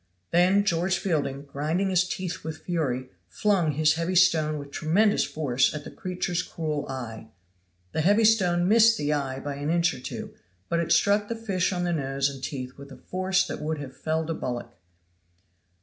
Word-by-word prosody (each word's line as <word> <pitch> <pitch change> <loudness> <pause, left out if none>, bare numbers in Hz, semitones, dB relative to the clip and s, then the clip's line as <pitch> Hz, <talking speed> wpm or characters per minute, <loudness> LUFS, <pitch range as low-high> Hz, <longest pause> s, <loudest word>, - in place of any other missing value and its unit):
Then 185 +4 +4
George 175 +1 +1
Fielding, 140 -7 -1
grinding 155 +7 -1
his 185 0 +2
teeth 185 -2 -4
with 160 0 -6
fury, 130 -7 -2 0.2
flung 180 - +1
his 150 +1 +3
heavy 165 +3 -2
stone 160 -4 +4
with 140 -1 -8
tremendous 200 +9 +2
force 135 -3 +1
at 150 - -5
the - - -9
creature's 180 -4 -2
cruel 155 -4 -4
eye. 115 -4 -6 0.6
The 160 - -1
heavy 205 +7 +4
stone 180 -5 +3
missed 225 +2 +6
the 150 -3 0
eye 135 -2 -2
by 140 0 -5
an 145 +1 -3
inch 170 +1 +2
or - - -8
two, 130 - -7 0.4
but 170 - +1
it 170 0 -1
struck 205 +1 +3
the 230 - -3
fish 200 -5 -1
on 175 -1 -1
the 175 -1 0
nose 135 -2 0
and 135 -1 -9
teeth 130 -1 -5
with 140 0 -11
a - - -10
force 185 +1 0
that - - -6
would 155 +1 -2
have 135 -2 -8
felled 160 +2 -2
a - - 0
bullock. 120 -5 -5
160 Hz, 190 wpm, -26 LUFS, 140-185 Hz, 0.6 s, missed